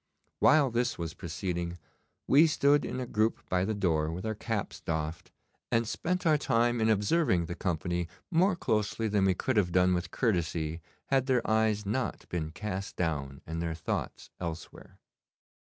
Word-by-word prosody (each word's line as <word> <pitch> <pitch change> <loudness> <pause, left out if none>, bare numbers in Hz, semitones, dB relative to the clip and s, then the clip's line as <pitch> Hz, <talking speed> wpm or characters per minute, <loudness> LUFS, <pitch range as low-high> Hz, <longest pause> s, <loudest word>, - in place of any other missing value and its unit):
While 145 -5 +5
this 120 +1 0
was 85 -2 -4
proceeding 85 0 -4 0.5
we 150 +5 +6
stood 145 -1 +3
in - - -4
a 130 - -2
group 110 -1 0
by 90 0 +2
the 110 +1 -1
door 80 -6 +1
with 90 +5 -5
our 110 - -1
caps 110 -1 -4
doffed, 80 0 -3 0.4
and 115 -1 +2
spent 180 +10 -2
our 155 -2 +4
time 120 -2 +2
in 110 - +3
observing 105 - +2
the 85 - -4
company 85 -1 -2 0.2
more 185 +3 +3
closely 110 -5 0
than 100 -2 +2
we 95 -1 +3
could 130 +5 -1
have 90 -4 +2
done 90 +1 +4
with 90 0 -1
courtesy 85 - -1 0.3
had 135 -1 +2
their 125 -3 +2
eyes 110 -1 +2
not 110 +2 -2
been 80 -3 -2
cast 95 +3 -5
down 70 -6 -2
and 80 +1 -4
their 85 -1 -2
thoughts 80 - -4
elsewhere. 85 -2 -7
100 Hz, 170 wpm, -30 LUFS, 85-120 Hz, 0.5 s, we